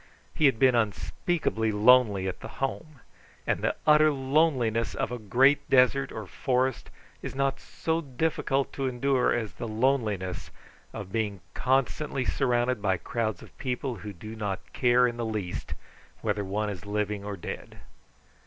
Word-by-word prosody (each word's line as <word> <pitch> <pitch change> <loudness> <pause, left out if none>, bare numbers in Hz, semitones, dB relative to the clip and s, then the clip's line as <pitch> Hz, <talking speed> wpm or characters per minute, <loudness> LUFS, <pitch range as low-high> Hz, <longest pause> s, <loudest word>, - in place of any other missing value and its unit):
He 155 - +4
had 130 - +2
been 130 +1 +5
unspeakably 110 - 0
lonely 105 -3 +5
at 95 - -4
the - - -7
Home; 140 0 -4 0.4
and - - 0
the - - 0
utter 155 0 +6
loneliness 130 -5 +1
of - - -2
a 125 - -4
great 130 +7 +3
desert 135 +1 +4
or 110 - -6
forest 125 +1 -1 0.3
is - - -6
not 135 0 0
so 165 0 -2
difficult 140 -1 -1
to 135 -1 -2
endure 130 +1 +1
as 115 -3 -1
the 115 - -6
loneliness 110 -6 0 0.4
of 95 - -7
being 105 -3 -1
constantly 135 +1 0
surrounded 125 -3 +1
by 95 -2 +1
crowds 110 +2 -3
of - - -16
people 125 -1 -3
who 105 +2 -7
do 110 +4 -9
not 100 -4 -5
care 125 0 +4
in 120 -1 -1
the 120 - -2
least 105 -5 -4 0.5
whether 105 -2 0
one 105 +2 -2
is 100 +1 -8
living 105 -1 -2
or 100 -1 -5
dead. 85 - -7
120 Hz, 155 wpm, -28 LUFS, 105-135 Hz, 0.5 s, utter